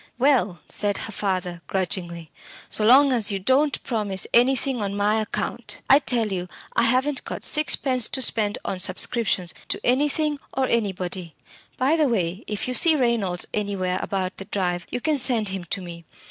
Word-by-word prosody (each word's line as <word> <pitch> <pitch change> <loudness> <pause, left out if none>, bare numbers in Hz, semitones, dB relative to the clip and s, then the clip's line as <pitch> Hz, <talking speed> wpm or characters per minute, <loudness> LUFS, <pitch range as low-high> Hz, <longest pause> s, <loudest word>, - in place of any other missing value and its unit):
"Well" 235 - +1
said 205 -1 +1
her - - -6
father, 185 -4 -3
grudgingly, 175 -3 -3 0.4
"so 215 - +3
long 265 +5 +6
as 220 -4 +2
you 200 - -1
don't 265 +9 +1
promise 205 -5 -1
anything 255 0 +2
on 200 0 -3
my 210 +2 +1
account! 215 - -4
I 275 - +8
tell 240 -6 +1
you, 180 -1 -4 0.3
I - - +3
haven't 260 +4 +1
got - - -7
sixpence 265 -5 +3
to 265 - -3
spend 210 -3 +1
on 190 - -3
subscriptions 190 -4 0
to - - -1
anything 295 +3 +1 0.2
or 265 0 +1
anybody. 185 -6 -2 0.4
By 280 +6 +2
the 300 -4 +2
way, 190 -3 -2
if 210 +2 -3
you 255 - -2
see 320 +5 +7
Reynolds 230 -9 0
anywhere 195 -3 -2
about 190 -1 -3
the 195 - -8
drive, 180 -3 -3
you 245 - -4
can 300 +1 +1
send 235 -5 +2
him 190 -2 -6
to 190 - -3
me. 170 -1 -10
210 Hz, 175 wpm, -23 LUFS, 185-255 Hz, 0.4 s, I